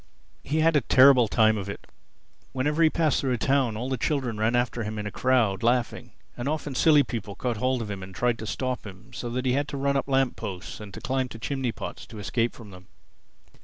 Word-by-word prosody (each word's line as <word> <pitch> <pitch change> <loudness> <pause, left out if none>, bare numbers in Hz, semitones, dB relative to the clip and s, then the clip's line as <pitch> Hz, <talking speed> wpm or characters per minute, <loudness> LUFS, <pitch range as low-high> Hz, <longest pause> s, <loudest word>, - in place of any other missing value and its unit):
He 155 +3 0
had 165 0 +3
a 145 - +4
terrible 130 -1 +6
time 110 0 +3
of 100 0 -6
it. 100 - -7 0.7
Whenever 150 +5 0
he 160 - +6
passed 155 -2 +1
through 130 -2 0
a - - 0
town 130 -3 +1
all 120 +3 -3
the 130 -1 -1
children 130 -7 -1
ran 110 +2 +2
after 120 -1 0
him 110 0 -4
in 105 - -4
a 105 - -4
crowd, 120 -6 +1
laughing; 120 +1 0 0.2
and 120 +3 -3
often 150 -2 -3
silly 150 +2 +5
people 110 -5 -5
caught 120 -3 -2
hold 125 0 0
of 105 - -6
him 100 -1 -5
and 95 0 -10
tried 120 +1 0
to 110 - -6
stop 130 +2 -3
him, 95 -2 -13
so 120 - -5
that 125 +2 -3
he 130 - +2
had 140 +2 0
to 145 - -5
run 140 0 0
up 135 - 0
lamp 135 -2 +1
posts 95 -5 -7
and 105 -2 -10
climb 130 -1 -1
to 115 - -9
chimney 130 +1 -2
pots - - -8
to 110 - -11
escape 115 +3 -1
from 110 -3 -12
them. 90 0 -14
125 Hz, 240 wpm, -26 LUFS, 110-135 Hz, 0.7 s, terrible